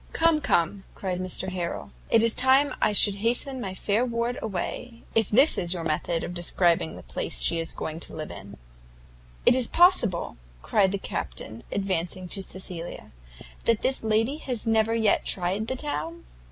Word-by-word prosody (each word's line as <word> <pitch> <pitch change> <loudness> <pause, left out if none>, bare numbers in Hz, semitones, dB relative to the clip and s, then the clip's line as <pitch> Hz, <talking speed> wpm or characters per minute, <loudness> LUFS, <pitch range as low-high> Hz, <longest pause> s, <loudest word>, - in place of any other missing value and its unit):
"Come, 325 -2 +2
come," 185 - 0
cried 185 -2 -4
Mr 185 +1 -2
Harrel, 180 -2 -5 0.2
"it 225 -1 +4
is 230 -1 +6
time 265 +3 +3
I - - +3
should 205 0 +6
hasten 245 +5 +3
my 190 -4 -5
fair 210 +5 0
ward 235 0 -2
away, 225 +4 -5
if 225 -1 +1
this 265 +8 +5
is 175 +1 0
your 170 - -5
method 165 +1 -1
of 175 - -5
describing 175 -1 +1
the - - -11
place - - -1
she 170 - +1
is 165 0 -1
going 160 +1 -5
to - - -6
live 155 -1 -6
in." 100 +1 -11 0.9
"Is 250 -1 +4
it - - -15
possible," 235 - +3 0.3
cried 195 -3 +2
the 200 - -1
Captain, 110 - -6
advancing 185 -2 -2
to 195 - -3
Cecilia, 180 -3 -7 0.5
"that 230 -2 +1
this 265 -2 0
lady 225 +6 +1
has 250 -7 -4
never 225 0 +2
yet 220 -3 +2
tried 190 +4 0
the 260 - -2
town?" 170 - -5
200 Hz, 175 wpm, -26 LUFS, 175-235 Hz, 0.9 s, is